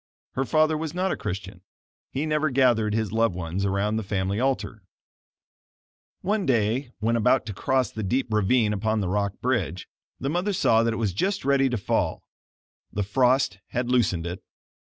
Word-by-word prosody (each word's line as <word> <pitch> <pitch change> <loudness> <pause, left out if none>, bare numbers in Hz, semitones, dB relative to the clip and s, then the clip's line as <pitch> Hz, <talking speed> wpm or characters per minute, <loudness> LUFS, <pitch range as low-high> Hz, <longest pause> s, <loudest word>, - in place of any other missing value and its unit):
Her 135 - -1
father 155 +4 +2
was 160 +1 -4
not 185 +1 0
a - - 0
Christian. 95 0 -6 0.5
He 140 +4 -2
never 155 0 +1
gathered 120 -5 +3
his 110 -3 -1
loved 115 -4 +1
ones 90 +3 -2
around 100 +2 0
the 110 - -2
family 100 0 -1
altar. 130 -4 -1 1.4
One 205 -1 0
day 120 +2 +1
when 110 +3 0
about 125 +2 +3
to 105 - -5
cross 130 +6 0
the 110 - -5
deep 120 +3 -1
ravine 105 +1 +3
upon 110 +1 0
the 95 - -1
rock 100 0 -1
bridge, 100 -9 -1 0.3
the 135 - -3
mother 180 +7 0
saw 115 -10 +3
that 115 0 +1
it - - -4
was 105 -5 -1
just 195 - -1
ready 135 -1 +3
to 120 - -1
fall. 100 - -1 0.7
The 105 - -1
frost 125 -1 +2
had 125 0 -2
loosened 100 -9 +2
it. 90 +2 -5
115 Hz, 175 wpm, -25 LUFS, 100-135 Hz, 1.4 s, gathered